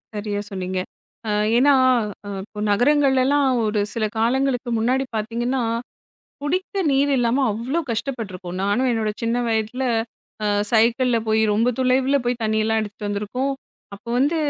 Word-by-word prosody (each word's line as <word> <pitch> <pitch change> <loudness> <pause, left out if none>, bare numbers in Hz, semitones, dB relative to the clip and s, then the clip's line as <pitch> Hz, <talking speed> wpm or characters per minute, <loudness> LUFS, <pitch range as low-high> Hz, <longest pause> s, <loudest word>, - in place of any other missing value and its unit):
சரியா 205 -1 -3
சொன்னீங்க. 185 -1 -3 0.5
ஆ - - -1 0.3
ஏன்னா, 280 +3 +5 0.7
இப்போ 210 +1 -11
நகரங்கள்லெல்லாம் 275 +3 +3 0.2
ஒரு 210 0 0
சில 225 -2 0
காலங்களுக்கு 250 +1 +1
முன்னாடி 255 +4 +1
பார்த்தீங்கன்னா, 235 +4 -1 0.8
குடிக்க 370 +6 -1
நீர் 275 +1 +2
இல்லாம 245 +3 +2
அவ்ளோ 245 +10 -2
கஷ்டப்பட்டுருக்கோம். 215 -7 -4
நானும், 205 +7 +1
என்னோட 220 -2 0
சின்ன 230 +1 0
வயதில 225 +3 -1 0.6
அ - - +1 0.2
சைக்கிள்ல 235 +2 +3
போய் 220 0 +3
ரொம்ப 225 +4 +2
தொலைவுல 260 +2 +2
போய் 240 0 -1
தண்ணியெல்லாம் 220 0 +1
எடுத்துட்டு 210 0 -5
வந்திருக்கோம். 210 +7 -2 0.4
அப்போ 205 +4 -14
வந்து 290 +6 +2
235 Hz, 130 wpm, -22 LUFS, 215-265 Hz, 0.8 s, ஏன்னா